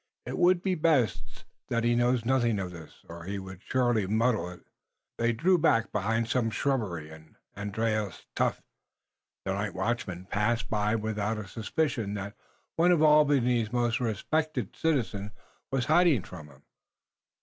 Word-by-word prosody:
It - - -4
would 180 0 +4
be 190 - +1
best 150 - 0 0.2
that 115 -1 0
he 120 0 +3
know 120 +1 +3
nothing 120 -3 +2
of 95 -2 -3
this, 85 -3 -13
or 85 0 -9
he 100 +2 -3
would 95 -1 -9
surely 120 -6 +1
muddle 110 -3 +1
it." 90 - -11 0.6
They 115 0 +2
drew 175 +10 +3
back 115 -7 +2
behind 110 +3 0
some 115 -1 +1
shrubbery, 105 - -2
and 80 0 -15 0.2
Andrius 105 0 -2
Tefft, - - 0 0.8
night 100 +2 -2
watchman, 95 -3 -2
passed 115 +4 -1
by 105 0 +1
without 110 0 -2
a 105 -2 -6
suspicion 115 - -2
that 100 0 -5 0.4
one 175 +2 +5
of 165 -3 +4
Albany's 135 -7 +4
most 120 -1 +1
respected 125 +2 -1
citizens 110 -10 -1 0.4
was 135 -2 0
hiding 155 - +4
from 80 -5 -10
him. 75 - -19
115 Hz, 150 wpm, -28 LUFS, 100-130 Hz, 0.8 s, one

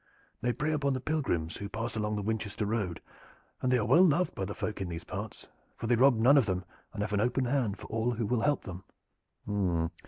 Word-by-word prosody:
"They 120 - +1
prey 150 +5 -1
upon 140 -3 +1
the 130 - -1
pilgrims 125 - -1
who 100 - -5
pass 115 +3 -4
along 105 -1 -1
the 105 - -2
Winchester 110 0 -2
Road, 105 -5 -2 0.6
and 130 - +1
they 125 - +5
are 110 - 0
well 135 +9 +6
loved 180 0 +4
by 95 - -3
the 100 - -5
folk 105 -2 -3
in 95 - -3
these 85 -1 -5
parts, 100 +3 -6 0.3
for - - -5
they 120 +1 +3
rob 130 +2 +6
none 130 +6 +6
of 120 - +1
them 90 -1 -1 0.3
and 105 -2 -3
have 105 0 -3
an 100 - +2
open 125 +3 +1
hand 120 -6 0
for - - -10
all 115 +2 0
who 115 -1 -2
will 120 +1 +1
help 145 +3 +1
them." 95 0 -7
110 Hz, 230 wpm, -30 LUFS, 100-130 Hz, 0.6 s, well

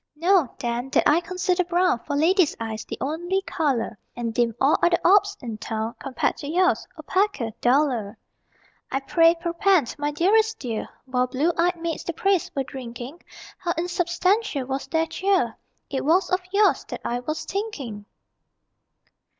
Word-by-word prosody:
Know, 340 -3 +3
then, 240 0 -3
that - - +4
I 310 - +5
consider 365 +1 0
brown 355 -5 +2
For 285 +4 -4
ladies' 335 +2 +3
eyes, 225 -1 -4
the - - -6
only 350 +7 -1
color; 265 - -1 0.2
And 235 -2 -3
deem 230 -1 +1
all 275 +3 +3
other 345 0 +4
orbs 400 +2 +5
in 225 -3 -5
town 220 +1 -3
(Compared 275 -2 -1
to 285 - -7
yours), 365 +3 +2
opaquer, 380 - 0
duller. 245 -5 +2 0.7
I 270 - -1
pray, 330 +4 +4
perpend, 340 - +1
my 290 0 0
dearest 425 +9 +2
dear; 230 -4 -4 0.2
While 255 -1 0
blue 295 +7 0
eyed 345 +1 +1
maids 330 -1 -3
the 340 - -3
praise 385 +1 +1
were 275 - 0
drinking, 250 +4 -8 0.4
How 345 -2 -1
insubstantial 350 - 0
was 270 +1 -3
their 320 0 +1
cheer 370 - 0 0.3
It 270 - -3
was 345 +6 +2
of 370 0 +2
yours 410 +1 +3
that - - -7
I 240 +1 -1
was 310 +5 -4
thinking! 290 - -5
315 Hz, 160 wpm, -24 LUFS, 250-365 Hz, 0.7 s, I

